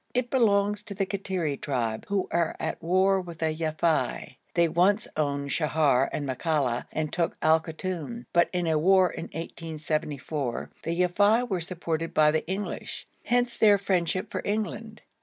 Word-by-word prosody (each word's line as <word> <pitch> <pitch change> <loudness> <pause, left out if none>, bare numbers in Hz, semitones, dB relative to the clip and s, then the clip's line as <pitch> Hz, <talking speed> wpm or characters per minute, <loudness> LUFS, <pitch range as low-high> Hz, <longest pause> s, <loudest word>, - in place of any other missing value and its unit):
It 245 -1 0
belongs 210 -4 +3
to 200 - -7
the 195 0 0
Kattiri 185 -7 -2
tribe, 115 -6 -2
who 200 -2 0
are 170 -1 +1
at - - -3
war 190 +3 +3
with 170 -2 -9
the 160 -1 0
Yafei. 160 0 -1 0.2
They 170 -1 +4
once 185 +6 +2
owned 140 -2 -1
Sheher 150 -4 +2
and 145 - -3
Makalla 130 -2 0
and 155 -1 -3
took 170 -1 -1
Al 160 +1 +5
Koton, 180 +7 -5
but 170 -1 +4
in 180 -1 -1
a 160 -2 +2
war 185 +2 +4
in - - -6
1874 155 -4 -4
the 170 +1 -3
Yafei 205 +7 +3
were 190 -6 -1
supported 165 -1 -3
by 150 -1 +5
the 160 +1 -1
English; 195 +3 -4 0.2
hence 245 0 +1
their 205 -2 +5
friendship 185 0 -1
for - - -2
England. 215 +1 -3
170 Hz, 160 wpm, -27 LUFS, 155-195 Hz, 0.2 s, Al